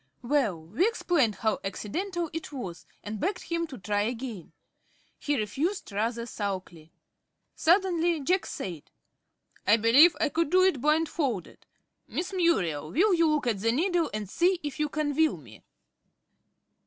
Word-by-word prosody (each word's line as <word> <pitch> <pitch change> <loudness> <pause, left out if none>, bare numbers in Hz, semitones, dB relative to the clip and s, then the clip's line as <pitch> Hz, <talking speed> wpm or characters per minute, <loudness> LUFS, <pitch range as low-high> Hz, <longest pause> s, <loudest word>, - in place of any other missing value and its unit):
Well, 240 - +1
we 210 - 0
explained 320 - +1
how 215 +3 0
accidental 340 - -3
it 325 -1 -5
was, 195 -12 -7 0.2
and 210 0 -5
begged 365 +2 -1
him 335 0 -2
to 270 -5 -9
try 205 +1 -1
again. 230 -4 -4 0.7
He 290 -1 0
refused 275 - -2
rather 230 +3 -1
sulkily. 185 -7 -5 0.6
Suddenly 345 -2 +2
Jack 365 +7 +1
said: 170 -6 -6 0.8
"I 210 +3 +6
believe 270 +10 +6
I 305 - +2
could 330 0 0
do 370 +2 +5
it 370 -9 +2
blindfolded. 300 - -1 0.4
Miss 365 +3 -4
Muriel, 180 - +1
will 380 - +3
you 335 -2 +4
look 300 -3 +1
at 225 -5 0
the 230 +3 +1
needle, 335 +4 +1
and 210 -1 -4
see 350 - +2
if 295 +1 -5
you 300 -1 0
can 290 -1 -2
will 315 - +2
me?" 115 -8 -15
280 Hz, 150 wpm, -28 LUFS, 210-335 Hz, 0.8 s, I